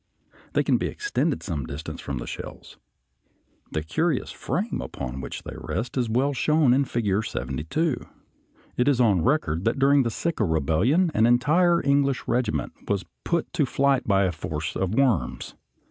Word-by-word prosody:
They - - +3
can - - +3
be - - -1
extended 410 - -1
some 75 -9 -3
distance 70 +3 -6
from 70 - -4
the - - -5
shells. - - -8 0.9
The 80 - -2
curious 145 - 0
frame - - -2
upon 65 +2 -5
which - - -6
they - - -7
rest 120 +2 -4
is 125 -3 0
well 130 +5 +1
shown 150 0 +3
in 140 +2 +3
Figure 110 -5 0
72. 80 - -2 0.8
It 125 - +2
is 140 -3 +3
on 105 -8 +4
record 85 - +1
that 115 - +1
during 140 +1 +5
the 120 - 0
Sikh 170 +8 -3
rebellion 95 - +2
an 110 +1 +4
entire 165 +8 +3
English 140 -1 +2
regiment 125 +1 0
was 100 -2 -1 0.2
put 170 -1 -1
to 155 -6 +1
flight 135 +1 +1
by 100 -1 +4
a 95 - +1
force 80 -1 -4
of 95 +2 -1
worms. 130 - +1
120 Hz, 165 wpm, -25 LUFS, 85-140 Hz, 0.9 s, during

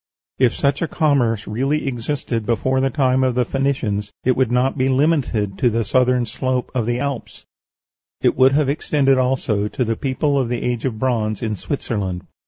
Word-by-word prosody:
If 125 -3 +3
such 140 -1 0
a 165 - 0
commerce 125 - +1
really 135 +8 -1
existed 120 -2 -3
before 130 +4 0
the 135 - +2
time 130 -2 +2
of 130 -2 +1
the 125 -1 +2
Phoenicians, 115 -7 -1
it 130 -1 +2
would 130 -3 +1
not 125 +2 +2
be 130 -1 +1
limited 130 -8 +1
to 125 - +3
the 115 0 -1
southern 125 +2 +2
slope 130 +2 -2
of 120 -4 -1
the 120 0 0
Alps; 140 -3 -5 0.7
it - - +2
would 130 +1 +5
have 145 -1 +2
extended 140 -2 +2
also 125 -5 0
to 125 +4 -2
the 115 0 -1
people 140 +2 0
of 125 -3 -1
the 120 -1 -2
age 120 -1 -2
of 120 -5 -2
bronze 110 -4 -1
in 110 -2 -1
Switzerland. 100 -8 -3
125 Hz, 190 wpm, -20 LUFS, 115-135 Hz, 0.7 s, would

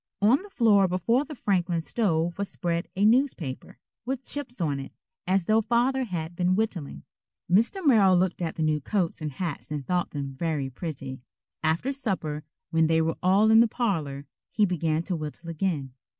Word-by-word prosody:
On 230 - +4
the 410 - -12
floor 210 - +4
before 230 - +1
the 300 - -8
Franklin 175 -7 0
stove 170 -5 0
was 200 - -1
spread 170 -1 -2
a 200 +2 +2
newspaper, 215 - +1 0.3
with 260 +2 -3
chips 255 -3 -3
on 145 -5 0
it, 135 - -7 0.4
as 190 -1 +2
though 220 +3 +3
Father 245 +4 +1
had 170 -5 -4
been 180 +1 +2
whittling. 175 - -3 0.4
Mr. 230 - +2
Merrill 200 -9 +6
looked 185 0 0
at 165 -2 -2
the 160 - -1
new 155 -1 +1
coats 175 +1 -1
and 150 -2 -4
hats 165 0 -4
and 150 -3 -4
thought 180 +2 0
them 140 -2 -5
very 140 -2 -2
pretty. 135 -3 -6 0.4
After 160 +12 0
supper, 180 - -3 0.3
when 160 -1 +3
they 160 0 +3
were 165 0 -1
all 195 +4 +4
in 220 - +7
the 230 - +6
parlor, 160 - -2 0.2
he 210 - +2
began 165 -3 0
to 180 - -2
whittle 155 +2 -6
again. 155 -6 -2
180 Hz, 180 wpm, -26 LUFS, 155-220 Hz, 0.4 s, in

